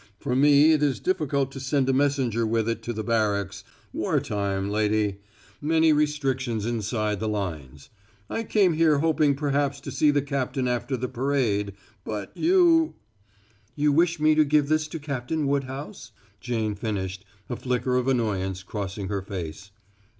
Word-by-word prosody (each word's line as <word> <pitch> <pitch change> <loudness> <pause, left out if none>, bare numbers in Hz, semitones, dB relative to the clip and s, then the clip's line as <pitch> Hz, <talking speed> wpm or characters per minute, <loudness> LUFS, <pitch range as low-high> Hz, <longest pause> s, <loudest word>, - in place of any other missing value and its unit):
For 125 +2 -2
me 145 +3 +6
it 155 -2 +3
is 145 -3 +1
difficult 145 -7 0
to 135 - -8
send 135 0 0
a 135 - +2
messenger 130 -4 +1
with 115 0 0
it 115 0 -2
to 120 - -4
the 110 -1 -4
barracks 100 -3 0 0.3
war - - 0
time, 100 -1 -2
lady 105 -1 0 0.4
many 160 +1 +3
restrictions 135 -7 0
inside 110 -2 -1
the 110 - -2
lines. 80 -10 -5 0.4
I 225 - -3
came 200 -5 +3
here 155 -2 +3
hoping 155 -2 +2
perhaps 140 -1 0
to - - -7
see 150 - +3
the 145 -1 +2
captain 135 -2 -2
after 125 +2 -1
the 125 +1 -3
parade. 120 -7 0 0.3
But 105 -3 -6
you 335 -2 +4 0.4
" 100 +2 -35
"You 150 0 +4
wish 170 +2 +2
me 155 +1 +4
to 155 0 +5
give 150 -1 +2
this 155 0 +1
to 160 - -6
Captain 145 +1 -3
Woodhouse?" 140 - -3 0.3
Jane 110 -3 -2
finished, 100 -3 -4 0.2
a 120 - -3
flicker 125 +1 -1
of 125 0 +1
annoyance 95 -7 -1
crossing 100 0 -5
her 100 -2 -2
face. 95 -1 -7
125 Hz, 165 wpm, -25 LUFS, 105-145 Hz, 0.4 s, me